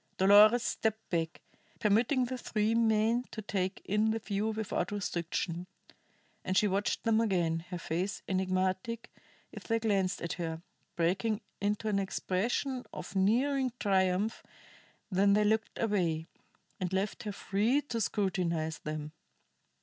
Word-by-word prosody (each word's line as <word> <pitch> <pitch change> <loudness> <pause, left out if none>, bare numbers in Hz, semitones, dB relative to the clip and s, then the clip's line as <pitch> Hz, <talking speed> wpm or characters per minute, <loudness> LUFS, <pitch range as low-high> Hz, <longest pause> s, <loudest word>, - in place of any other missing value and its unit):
Dolores 210 +5 +7
stepped 220 -1 -1
back, 165 -1 -1 0.4
permitting 230 +5 +3
the 255 +1 -4
three 215 -1 0
men 230 +1 +2
to - - -7
take 195 -2 -2
in 210 +2 +2
the 220 - +1
view 210 -1 -2
without 215 -4 -2
restriction. 175 -2 -2 0.8
And 185 - 0
she 210 - +4
watched 200 +1 0
them 225 -1 +3
again, 170 -6 0
her 180 - -4
face 175 +4 -3
enigmatic 185 +4 -1 0.4
if - - -10
they 230 - +1
glanced 195 -4 +1
at 170 - -2
her, 165 0 -4 0.3
breaking 190 +6 +1 0.2
into 210 +2 0
an 205 -2 +2
expression 230 +7 -1
of - - -8
nearing 255 +6 +2
triumph 190 +1 +1 0.7
when 200 +1 +4
they 210 +1 +4
looked 220 +1 +1
away, 175 -8 0 0.5
and 185 -1 -2
left 190 +2 -1
her 210 - -4
free 210 +7 +1
to 230 -5 -3
scrutinize 175 -7 -1
them. 150 0 -5
200 Hz, 135 wpm, -31 LUFS, 185-220 Hz, 0.8 s, Dolores